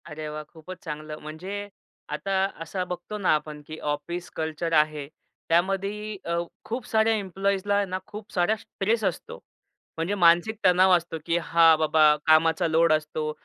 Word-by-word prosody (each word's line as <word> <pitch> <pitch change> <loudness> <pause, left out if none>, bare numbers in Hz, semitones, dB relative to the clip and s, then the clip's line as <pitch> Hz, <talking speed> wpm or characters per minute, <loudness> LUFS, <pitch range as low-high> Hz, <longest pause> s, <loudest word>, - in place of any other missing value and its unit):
अरे 155 0 -6
वाह! 150 0 -6
खूपच 175 +3 -10
चांगलं 155 -1 -6
म्हणजे 185 +7 -6 0.4
आता 150 +6 -3 0.3
असा 180 +3 -3
बघतो 180 +4 -6
ना, 200 - 0
आपण 150 -1 -5
की 155 - -7
ऑफिस 150 +4 -4
कल्चर 160 +1 -3
आहे. 150 -2 +2 0.4
त्यामध्ये 195 +5 0
अ, 170 0 -1 0.3
खूप 235 0 -4
साऱ्या 220 0 +3
एम्प्लॉइजला 200 0 -1
आहे 205 0 +2
ना, 185 0 -4
खूप 210 0 -10
साऱ्या 180 +4 +2
स्ट्रेस 220 +1 -2
असतो. 190 -4 -3 0.6
म्हणजे 170 +5 -1
मानसिक 175 +4 +4
तणाव 185 +1 +5
असतो. 170 -1 -6
की 165 - +1
हा 165 -1 +5
बाबा 155 -1 +4
कामाचा 160 +1 +4
लोड 165 0 +4
असतो. 155 0 -1
170 Hz, 155 wpm, -26 LUFS, 155-195 Hz, 0.6 s, तणाव